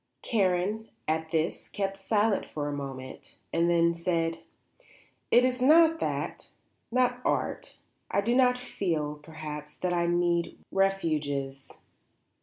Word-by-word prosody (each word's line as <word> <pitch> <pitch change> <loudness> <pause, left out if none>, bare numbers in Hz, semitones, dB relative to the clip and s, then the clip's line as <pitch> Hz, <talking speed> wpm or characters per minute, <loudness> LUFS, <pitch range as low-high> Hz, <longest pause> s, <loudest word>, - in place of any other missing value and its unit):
Karen, 205 0 0 0.2
at 160 +1 0
this, 160 +1 -1
kept 195 -1 -2
silence 205 +1 +1
for 145 -1 -3
a 145 - -2
moment, 135 -2 -7 0.2
and 170 +1 +3
then 170 0 +4
said: 170 -1 -1 0.9
"It 245 +1 +6
is 255 0 0
not 325 +4 +6
that; - - -3 0.4
not 250 0 +2
art. - - -2 0.3
I 200 - +2
do 235 +4 +1
not 250 -1 +4
feel, 160 -11 -2
perhaps, 150 -1 -8
that 180 -1 -1
I 170 0 +1
need 175 0 +1
refuges. 150 -8 0
175 Hz, 125 wpm, -28 LUFS, 155-220 Hz, 0.9 s, It